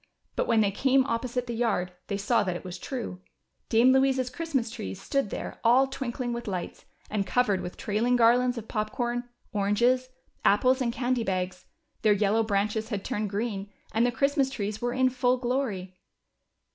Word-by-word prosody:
But - - 0
Avhen 225 -2 +4
they 200 -2 +2
came 265 +5 +3
oj^posite 245 0 -2
the 240 - -4
yard, 220 -6 0 0.2
they 200 - -2
saw 210 +4 +2
that 185 -3 -1
it - - -6
Avas 180 -1 -7
true. 235 -9 -5 0.5
Dame 240 +3 +5
Louisa's 265 -1 +2
Christmas 280 -9 -2
trees 220 -5 -6
stood 275 +1 -1
there - - -6
all 250 +4 +5
tAvinkling 250 -2 -3
Avith 235 -1 -5
lights, 185 -3 -5 0.3
and 200 -2 -1
covered 210 -6 +2
Avith 180 - -6
trailing 225 +4 +1
garlands 245 +1 +4
of 225 -1 -6
pop 215 -1 -2
corn, 245 0 -2 0.2
oranges, 235 +6 +2 0.3
apples, 255 +6 +4
and 240 -2 +1
candy 245 0 0
bags 185 -2 -2
j - - -38 0.3
their 215 -2 +5
yellow 205 +2 +2
branches 215 +1 0
had 205 -4 -3
turned 210 0 -2
green 200 -1 -3 0.2
and 225 +3 +2
the 245 - +3
Christ 275 +4 +1
mas 270 -1 +3
trees 215 -5 -4
were 245 0 0
in 260 +1 +2
full 250 0 +2
glory. 240 -8 -2
235 Hz, 185 wpm, -27 LUFS, 205-250 Hz, 0.5 s, Dame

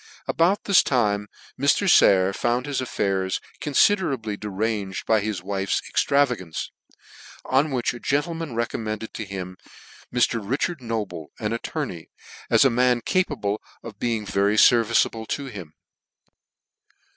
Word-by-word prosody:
About 180 +5 +2
this 200 -3 +5
time 105 -5 0 0.3
Mr. 140 +9 +2
Sayer 95 - +5
found 120 +4 0
his 140 -3 -2
affairs 95 -6 -1 0.2
confiderably 140 - +1
deranged 105 -1 -3
by 110 -1 +3
his 100 -3 -3
wife's 95 0 -1
extravagance; 125 - 0 0.7
on 135 +4 +2
which 125 -4 -1
a 120 - -8
gentleman 155 0 -2
recommended 110 -2 -3
to 110 - -5
him 95 -2 -7 0.5
Mr. 120 -1 +2
Richard 135 +8 -2
Noble, 105 -9 -4
an 105 +1 -2
attorney, 115 - -5 0.4
as - - +5
a 135 - +5
man 125 0 +2
capable 120 - -1 0.2
of - - -10
being 115 -3 -1
very 100 +2 +1
fehviceablc 115 -1 +4
to 140 - -3
him. 95 - -9
115 Hz, 125 wpm, -24 LUFS, 100-135 Hz, 0.7 s, this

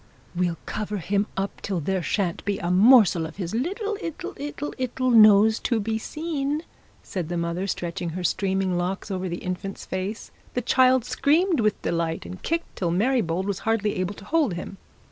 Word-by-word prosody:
'We'll 175 -1 0
cover 210 -1 -3
him 200 +3 0
up 195 +1 -3
till 190 -3 -2
there 190 +4 -1
shan't 180 -1 -1
be 200 -1 -1
a 175 - -2
morsel 195 -4 +6
of 160 - -12
his 180 -2 -4
little 400 - -2
'ittle, 330 -5 -5
'ittle, 290 +1 -5
'ittle 255 0 0
nose 215 -1 +7
to 235 - 0
be 220 +1 -1
seen,' 300 +2 -3 0.4
said 175 -4 -4
the 175 - -2
mother, 170 +3 -2
stretching 175 -1 -3
her 180 - -4
streaming 190 0 0
locks 190 +3 -3
over 185 -1 -2
the 175 - -5
infant's 185 +2 -4
face. 190 +4 -4 0.2
The 250 - 0
child 255 0 +4
screamed 320 +6 +2
with 215 -2 +1
delight, 165 - -1
and 90 +1 -8
kicked 330 0 -3
till 175 - 0
Mary 235 +9 +2
Bold 175 +1 -2
was 200 -2 -2
hardly 215 -2 0
able 185 +2 -2
to 200 - -12
hold 300 - +1
him. 185 +3 -7
200 Hz, 185 wpm, -25 LUFS, 180-250 Hz, 0.4 s, nose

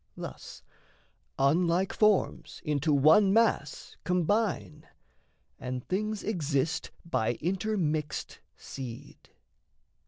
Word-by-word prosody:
Thus - - -8 0.7
unlike 170 +6 +2
forms 210 -3 +1
into 150 0 0
one 155 +8 +6
mass 215 -10 +1
combine, 180 -3 0 0.7
And 125 -1 -5
things 215 +2 -2
exist 160 -6 -1 0.2
by 120 -8 0
intermixed 175 - -2 0.2
seed. 125 -4 -9
165 Hz, 75 wpm, -29 LUFS, 145-195 Hz, 0.7 s, one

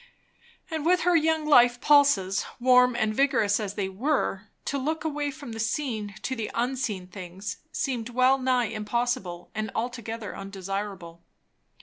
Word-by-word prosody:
And 315 -2 -2
with 360 +3 +3
her 355 +1 +3
young 320 -1 +2
life 245 -4 +5
pulses, 225 -11 +4 0.2
warm 250 0 +5
and 220 -2 0
vigorous 230 -5 +2
as 205 -2 -4
they 200 -2 -1
were, 220 -1 -1 0.2
to 280 - -1
look 310 +4 -2
away 295 -2 -1
from 280 -3 -8
the 225 - -6
seen 220 -4 -2
to 260 - -2
the 225 -3 -4
unseen 240 -6 -1
things 185 +2 -7
seemed 250 -6 -2
well 255 +2 +3
nigh 255 -2 +2
impossible 215 -4 -2
and 215 +1 -3
altogether 230 -2 -4
undesirable. 195 -3 -6
235 Hz, 145 wpm, -27 LUFS, 205-270 Hz, 0.2 s, life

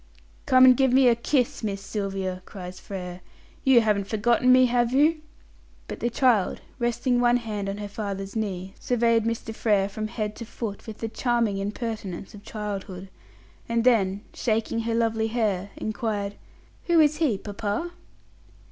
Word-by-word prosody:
"Come 255 0 +7
and 255 -1 +8
give 265 0 +3
me 260 0 +5
a 240 - +6
kiss, 245 +1 0
Miss 200 -2 -2
Sylvia!" 195 -2 -3
cries 185 -2 -8
Frere. 180 -2 -7 0.4
"You 260 -3 +6
haven't 205 -3 +1
forgotten 235 +4 +3
me, 255 0 +7
have 240 -1 +2
you?" 305 +4 +3 0.7
But - - -6
the 240 - 0
child, 235 -5 +2 0.2
resting 240 +1 +1
one 240 0 +4
hand 210 -4 -4
on 195 - -4
her 205 0 -5
father's 200 -2 -5
knee, 195 -3 -3
surveyed 230 -2 +2
Mr. 230 -1 -3
Frere 205 -3 +2
from 215 +2 -4
head 215 -2 -4
to 230 - -6
foot 220 -2 -6
with 220 -1 -7
the 225 - -1
charming 230 -3 0
impertinence 205 -2 -5
of 205 - -11
childhood, 195 -3 -6 0.6
and 230 0 +1
then, 205 -5 +3
shaking 225 0 -1
her 225 -1 0
head, 210 -4 -1
inquired: 215 -2 -2 0.5
"Who 340 -1 +4
is 305 -1 +4
he, 295 -11 +1
papa?" 205 - -3
220 Hz, 155 wpm, -25 LUFS, 200-240 Hz, 0.7 s, and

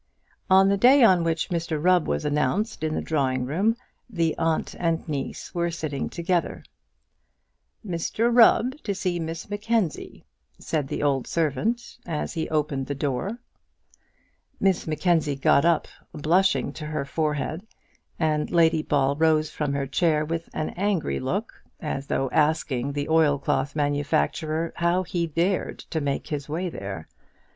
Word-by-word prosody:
On 190 +1 +6
the 200 - +2
day 255 +6 +6
on 185 -6 +5
which 165 -1 -1
Mr 170 -2 -1
Rubb 180 +1 +3
was - - -1
announced 150 - 0
in 155 0 -1
the - - -2
drawing 130 -5 0
room, 195 - +1 0.3
the 170 -7 0
aunt 160 -1 0
and 165 -1 0
niece 145 -3 -5
were 170 -1 0
sitting 155 -5 -3
together. 175 0 -1 1.2
"Mr 215 +6 0
Rubb 245 +2 +5
to 200 - -3
see 180 -2 -1
Miss 165 0 -5
Mackenzie," 205 -3 -2 0.3
said 150 -4 -2
the - - -3
old 135 -3 +1
servant, 170 - -1
as 160 -3 -3
he 160 -1 -3
opened 150 -3 -1
the 145 - -3
door. 145 - -2 1.2
Miss 190 -4 +1
Mackenzie 155 -2 +1
got 140 +2 +3
up, 170 -1 +2 0.3
blushing 180 +6 +2
to 155 -1 -7
her 150 -2 -3
forehead, 155 +2 -2 0.6
and 155 -2 0
Lady 165 -2 +3
Ball 140 -2 +1
rose 155 0 +2
from 150 -2 -2
her 140 -1 -1
chair 155 +2 +1
with 165 +1 -4
an 155 - -3
angry 180 - -1
look, - - -2 0.3
as 135 0 -4
though 135 - 0
asking 150 -4 +1
the 145 0 -2
oilcloth 145 -3 +2
manufacturer 145 - 0
how 170 +2 +2
he 175 -1 -2
dared 175 +5 0
to 160 - -1
make 140 -1 -2
his 145 -2 -4
way 165 +5 -2
in 175 - -4
there. 95 -5 -6
160 Hz, 150 wpm, -25 LUFS, 145-175 Hz, 1.2 s, On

